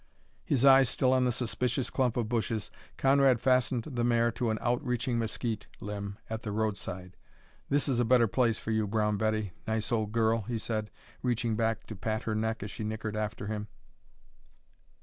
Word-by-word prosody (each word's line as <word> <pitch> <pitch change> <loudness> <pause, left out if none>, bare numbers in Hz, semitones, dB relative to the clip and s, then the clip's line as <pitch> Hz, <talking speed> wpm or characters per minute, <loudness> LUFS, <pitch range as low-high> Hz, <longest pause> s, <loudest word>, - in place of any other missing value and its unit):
His 135 -2 +2
eye 135 0 +9
still 130 0 +2
on 130 -1 +3
the 125 - +2
suspicious 125 +1 -1
clump 125 -3 +1
of 120 -3 0
bushes, 115 -2 -1 0.3
Conrad 135 -2 +4
fastened 125 -1 +2
the 120 -4 -3
mare 120 -1 +3
to 115 0 -1
an 110 - 0
outreaching 125 -1 0
mesquite 115 -1 -2
limb 100 0 -5
at 110 0 -4
the 105 - -4
roadside. 100 -4 -3 0.5
"This 145 +1 +2
is 130 -4 +1
a - - +4
better 120 0 +5
place 115 0 +1
for 110 - -4
you, 110 -1 +1
Brown 105 0 +1
Betty, 110 -2 -1
nice 110 +1 -1
old 110 -3 0
girl," 115 0 +2
he 115 +3 -3
said, 110 -1 -2 0.3
reaching 120 -2 0
back 110 0 0
to 110 - -7
pat 110 +3 -2
her 110 - -1
neck 110 0 -1
as 105 - -6
she 110 - -6
nickered 110 0 -3
after 105 -1 -3
him. 105 0 -4
115 Hz, 185 wpm, -30 LUFS, 110-125 Hz, 0.5 s, eye